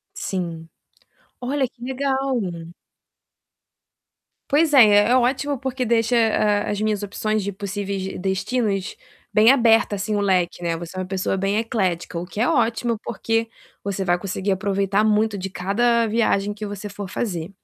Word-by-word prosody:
Sim. 170 -4 -4 0.7
Olha, 265 +1 0
que 240 0 -28
legal! 265 0 -1 2.1
Pois 300 +2 +3
é, 260 -4 +9
é 205 +1 +5
é - - +5
ótimo 265 +3 +1
porque 260 -1 -3
deixa, 230 +1 +2
hã, 215 -2 +2
as 205 0 -2
minhas 215 -1 0
opções 215 +1 -1
de 200 - -3
possíveis 200 0 -4
d 190 - -5
destinos 195 +1 -1 0.4
bem 215 +2 +6
aberto, 230 -5 +4
assim, 205 +2 -2
o 205 - +1
leque, 180 -3 +1
né. 170 -1 -1
Você 170 +2 -8
é - - -2
uma 185 - -2
pessoa 190 0 -2
bem 195 +2 0
eclética, 185 -7 -1
o 175 - -5
que 210 +4 -5
é 250 - +3
ótimo, 235 -4 +1
porque 225 +1 -1 0.3
você 195 -1 -3
vai 175 -1 +1
conseguir 195 +1 -2
aproveitar 200 +1 +1
muito 215 0 +2
de 195 0 -4
cada 230 +6 +1
viagem 205 -2 +1
que 210 +1 -6
você 205 0 -6
for 200 0 -7
fazer. 175 -6 -3
205 Hz, 165 wpm, -22 LUFS, 195-235 Hz, 2.1 s, é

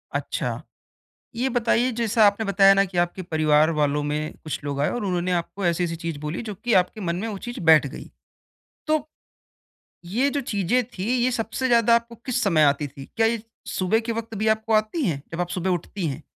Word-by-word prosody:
अच्छा। - - -2 0.7
ये 245 +3 0
बताइए 245 0 +1
जैसा 225 -1 +2
आपने 205 +2 +2
बताया 195 0 +6
ना 195 0 +4
कि 185 -2 -5
आपके 175 +2 0
परिवार 155 -2 +3
वालों 145 0 +1
में 150 +1 -2
कुछ 155 - -4
लोग 140 -1 -3
आए 145 - +2
और 245 - -3
उन्होंने 180 -1 -1
आपको 175 +2 -2
ऐसी-ऐसी 170 0 0
चीज़ 165 -3 -5
बोली 150 +6 -4
जो 215 -3 -6
कि 240 +5 -3
आपके 185 +3 +2
मन 170 -3 -2
में 200 +5 -3
वो 205 -3 -5
चीज़ 240 - -6
बैठ 160 -3 +6
गई। 135 - -9 0.8
तो, 310 -1 0 1.0
ये 240 +11 +1
जो 285 - -1
चीज़ें 240 -1 0 0.2
थी 185 - -2 0.2
ये 255 - +2
सबसे 240 +3 -2
ज़्यादा 235 -1 +5
आपको 235 0 0
किस 255 - 0
समय 170 -6 +3
आती 145 0 +3
थी? 135 0 -11
क्या 225 - +4
ये 225 -1 -1 0.2
सुबह 190 +4 +1
के 230 - +1
वक्त 225 0 -5
भी 215 +2 0
आपको 220 +1 -5
आती 215 +8 +1
हैं, 140 -5 -2
जब 165 - -4
आप 175 - -1
सुबह 180 +1 -2
उठती 180 +1 -2
हैं? 145 +1 -4
195 Hz, 210 wpm, -24 LUFS, 165-230 Hz, 1.0 s, बताया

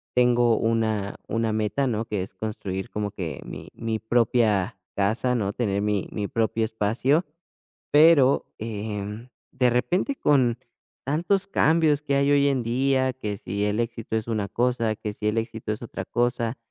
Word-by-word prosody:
tengo 120 -2 +4
una 110 -3 0
una 115 -1 0
meta, 110 +5 0
¿no?, 115 -1 -1
que 105 -4 -2
es 95 - -10
construir 95 -2 -5
como 105 -1 -3
que 80 -8 -5
mi - - -8
mi 115 -1 -3
propia 110 -4 +1 0.2
casa, 110 +5 +1
¿no?, 100 -4 0
tener 100 -5 -1
mi 105 -2 0
mi 105 -2 -3
propio 115 0 0
espacio. 115 - +1 0.7
Pero, 145 -3 +6
em, 105 +1 -5 0.2
de 125 -2 +2
repente, 180 - 0
con 125 - +2 0.5
tantos 175 +8 0
cambios 160 -5 +3
que 140 -2 0
hay 140 +1 +3
hoy 140 0 +4
en 135 -3 +1
día, 130 +2 +1
que 105 -5 -4
si 100 +1 -3
el 105 +1 0
éxito 115 -1 -3
es 110 0 -2
una 110 -3 -1
cosa, 115 0 0
que 105 0 -5
si 105 +1 -2
el 105 +2 0
éxito 110 -1 -3
es 105 - -6
otra 120 - -6
cosa, 120 0 -1
115 Hz, 165 wpm, -25 LUFS, 105-130 Hz, 0.7 s, Pero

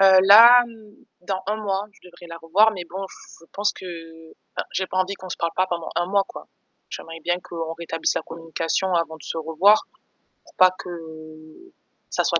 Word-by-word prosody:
Heu 190 -1 +7
là, 235 +5 +9 0.6
dans 190 +1 -3
un 210 +2 -1
mois, 200 -2 -2
je - - -25
devrais 175 0 -14
la 165 - -8
revoir, 195 +7 +3
mais 185 -4 -6
bon, 190 +2 -5
je 165 - -16
pense 205 +1 0
que 185 - -11 0.7
enfin - - -3
j'ai 190 - -1
pas 185 - -6
envie 185 +2 0
qu'on 185 -1 -11
se - - -5
parle 170 -1 -2
pas 185 - +1
pendant 170 -2 -4
un 175 +1 0
mois, 200 +1 +1
quoi. - - -11 0.4
J'aimerais 165 0 -8
bien 175 +2 0
qu'on 165 -1 -5
rétablisse 165 -1 -2
la - - -2
communication 165 +3 -3
avant 165 -2 -1
de 155 - -17
se - - -6
revoir, 165 +7 +3 0.6
pour - - -21
pas 185 0 +6
que - - -9 1.2
ça - - 0
soit - - +1
185 Hz, 200 wpm, -23 LUFS, 165-195 Hz, 1.2 s, là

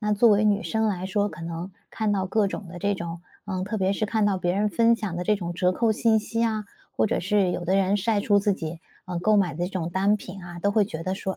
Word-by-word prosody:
那 210 -1 0
作 225 +3 +5
为 205 +1 +4
女 210 0 +2
生 220 0 0
来 185 -2 -2
说， 205 +2 0
可 170 - -10
能 170 +3 -5 0.2
看 220 -2 -1
到 190 -2 0
各 205 +1 +1
种 200 -1 -6
的 175 0 -9
这 205 0 +1
种 170 -1 -6 0.2
呃， 185 -2 -3
特 210 +2 -3
别 190 +1 +1
是 215 - -1
看 215 0 +1
到 200 - +2
别 175 -1 0
人 210 +1 +1
分 230 +2 +3
享 205 -6 -4
的 175 - -3
这 210 +4 +2
种 175 -3 -5
折 180 +1 +2
扣 220 +3 +1
信 220 0 +3
息 230 +2 -2
啊， 220 -2 0 0.3
或 - - +1
者 - - 0
是 190 0 +2
有 175 - -3
的 185 +3 +2
人 195 +1 +2
晒 205 +1 +1
出 205 -1 +3
自 205 0 +2
己， 165 -2 -5 0.2
呃， 180 -1 -4
购 215 +3 +3
买 180 -7 +2
的 175 - -2
这 - - -7
种 170 -3 -3
单 195 +3 +2
品 190 -2 -10
啊， 175 0 -9
都 200 +3 +1
会 210 -1 +4
觉 165 -4 -6
得 185 - -1
说” 190 0 -4
195 Hz, 305 characters per minute, -25 LUFS, 180-210 Hz, 0.3 s, 作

